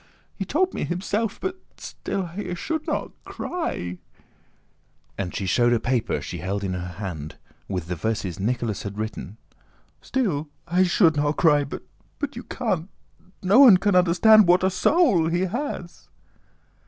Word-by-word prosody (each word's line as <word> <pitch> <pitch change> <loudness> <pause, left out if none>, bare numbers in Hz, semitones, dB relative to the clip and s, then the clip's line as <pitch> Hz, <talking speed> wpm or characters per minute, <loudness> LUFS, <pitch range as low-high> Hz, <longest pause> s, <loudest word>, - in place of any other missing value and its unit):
he 195 - -4
told 365 - +1
me - - -3
himself... 200 +5 -2
but 375 0 -4 0.2
still 195 -2 -4
I 195 -3 -4
should 315 - -3
not - - -2
cry," 90 - -4 1.2
and 95 -3 -4
she 100 - -2
showed 120 +5 +3
a 120 - +2
paper 120 -1 0
she - - -6
held 100 +2 -3
in 95 -2 -2
her 90 0 -5
hand—with 90 0 -7
the 90 +1 -4
verses 100 0 -3
Nicholas 115 0 -1
had 100 0 -6
written, 110 -1 -5 0.6
"still, 170 - -1 0.2
I 175 +2 +2
should 175 -3 +3
not 145 +1 +1
cry, 150 -4 +4
but 140 - -7 0.5
you 240 - -6
can't... 190 -7 -2 0.5
no 195 +7 +5
one 245 -9 +9
can 200 +2 +1
understand... 185 +4 +6
what 180 +1 +4
a 190 - +3
soul 195 - +3
he 175 +2 0
has!" 190 -3 -4
170 Hz, 150 wpm, -24 LUFS, -, 1.2 s, one